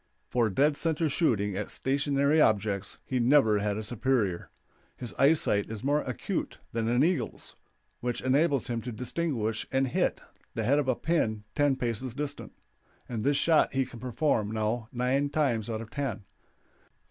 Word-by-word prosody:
For 120 -3 +2
dead 145 +8 +2
center 165 -1 0
shooting 105 - +1
at 105 +1 -3
stationary 140 +5 +2
objects 100 -4 +1
he 130 - -1
never 120 -4 +4
had 100 0 -1
a 110 - -4
superior. 110 -4 0 0.5
His 120 - -6
eyesight 135 -8 +3
is 110 +1 -6
more 145 +2 +2
acute 125 -6 -4 0.2
than 115 -1 -1
an 120 +3 +3
eagle's, 150 - -1 0.4
which 120 -1 -2
enables 140 +1 +2
him 115 -1 -2
to 125 - -5
distinguish 120 -3 -2
and 135 0 +2
hit - - 0 0.4
the 115 - -1
head 140 +7 +3
of 145 - -1
a 130 - +2
pin 110 -11 0
ten 145 -2 +2
paces 120 -1 -3
distant, 145 0 -4 0.6
and 115 -3 -4
this 140 +2 +2
shot 160 0 +3
he 135 0 +1
can 120 -1 -11
perform 125 -3 0
now 110 +1 -2
nine 130 +3 +1
times 130 -7 0
out 110 -1 -3
of 115 - -10
ten. 135 -8 -3
125 Hz, 165 wpm, -28 LUFS, 110-140 Hz, 0.6 s, never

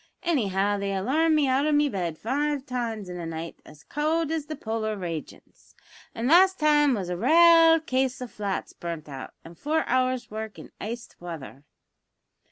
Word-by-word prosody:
Anyhow 205 - +1
they 200 0 -2
alarmed 305 +11 +2
me 295 -2 +3
out 265 +3 +2
o' - - +2
me 295 0 +3
bed 175 - -3
five 280 - -1
times 230 -5 -3
in 180 0 -6
a 170 - -5
night 165 0 -6
as 150 - -15
cowld 315 +2 -1
as 315 -2 -2
the 310 - -5
polar 220 -3 -3
ragions, 170 -5 -8 0.4
and 230 +2 -2
the 300 - +5
last 375 +2 +6
time 295 -3 +4
was 190 -4 -4
a - - -1
raale 330 - +6
case 260 -2 0
o' 250 - -4
two 240 - -14
flats 200 -2 -4
burnt 165 -3 -6
out, 135 -3 -8
an' 165 - -11
four 305 - -1
hours' 255 -1 0
work 220 0 -6
in - - -11
iced 230 +3 -7
wather." 155 -5 -9
240 Hz, 185 wpm, -26 LUFS, 190-295 Hz, 0.4 s, last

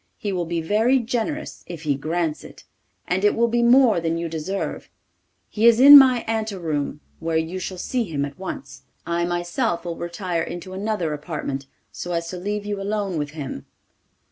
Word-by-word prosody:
He 210 -4 -3
will 175 -2 -1
be 170 0 -1
very 220 +10 +3
generous 245 +5 -3
if 170 -3 -8
he 150 -2 +1
grants 155 +2 -2
it, - - -13 0.4
and 185 +2 0
it 205 - +4
will 235 +1 +3
be 235 +1 +1
more 240 -4 +5
than 165 0 -1
you 170 0 -2
deserve. 165 +5 -4 0.6
He 225 +2 +2
is 235 0 +6
in 285 +3 +11
my 260 -3 +8
ante 220 -2 -1
room, 150 -4 -3 0.2
where 165 -1 -1
you 165 +3 -2
shall 185 0 -5
see 240 +6 -1
him 145 -6 -2
at 140 +2 -10
once. 185 -6 -7 0.2
I 170 0 0
myself 175 +1 -1
will 170 -1 -3
retire 175 0 -3
into 175 +3 -6
another 190 -5 -2
apartment, 145 -3 -5 0.2
so 175 - -5
as 170 0 -2
to 180 - -5
leave 205 +3 -3
you 205 -1 -3
alone 200 -4 -2
with 145 -1 -3
him. 135 - -6
180 Hz, 190 wpm, -23 LUFS, 165-215 Hz, 0.6 s, in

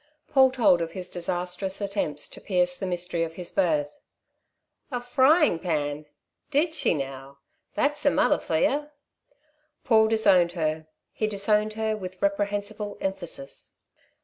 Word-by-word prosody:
Paul 265 -2 +6
told 235 -9 +3
of 165 0 -4
his 180 -1 -5
disastrous 180 +2 -2
attempts 195 -8 -2
to - - -11
pierce 180 -2 +1
the 190 - -4
mystery 175 -1 -1
of 165 0 -5
his 180 -1 -6
birth. 150 -6 0 0.9
"A 250 -4 -2
frying 260 - +3
pan? 150 -3 -2 0.4
Did 305 +3 +1
she 305 - +2
now? 135 -1 -6 0.4
That's 295 +1 0
a - - +8
mother 250 - +2
for 160 - -1
yer." 295 - 0 0.9
Paul 220 -2 +4
disowned 195 -6 +4
her. 155 -2 -2 0.2
He 215 - -1
disowned 210 +1 +2
her 220 0 -1
with 185 -3 -8
reprehensible 205 +1 -2
emphasis. 175 -7 -4
190 Hz, 140 wpm, -26 LUFS, 170-220 Hz, 0.9 s, a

